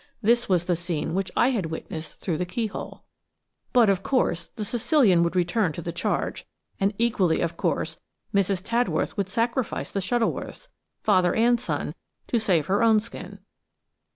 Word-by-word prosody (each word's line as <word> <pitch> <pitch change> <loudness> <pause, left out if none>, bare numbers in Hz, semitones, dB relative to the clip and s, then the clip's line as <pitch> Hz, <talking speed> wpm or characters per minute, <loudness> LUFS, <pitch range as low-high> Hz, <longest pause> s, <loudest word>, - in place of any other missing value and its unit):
This 235 +2 +3
was 180 -3 +3
the 175 - +1
scene 170 -2 -3
which 190 +1 -1
I 250 - +4
had 205 -10 -1
witnessed 160 0 -6
through 170 -4 -2
the - - +1
keyhole. 220 +3 -4 0.7
But, 240 -4 +5
of 195 -1 +2
course, 195 -9 0
the 215 -3 -4
Sicilian 230 - +3
would 170 +1 0
return 180 0 +1
to 170 - -6
the 170 - -3
charge, 170 - -2 0.3
and 195 0 +2
equally, 200 -8 +2
of 170 0 -1
course, - - -1 0.3
Mrs. 195 -2 +1
Tadworth 235 +3 0
would 200 -3 -2
sacrifice 235 +4 -1
the 200 - -1
Shuttleworths, 240 - -2 0.3
father 180 -1 +3
and 235 +1 +4
son, 250 - -3 0.4
to 235 - +2
save 180 -8 +2
her 195 +6 +1
own 225 -2 +5
skin. 205 -3 -9
200 Hz, 165 wpm, -25 LUFS, 175-230 Hz, 0.7 s, But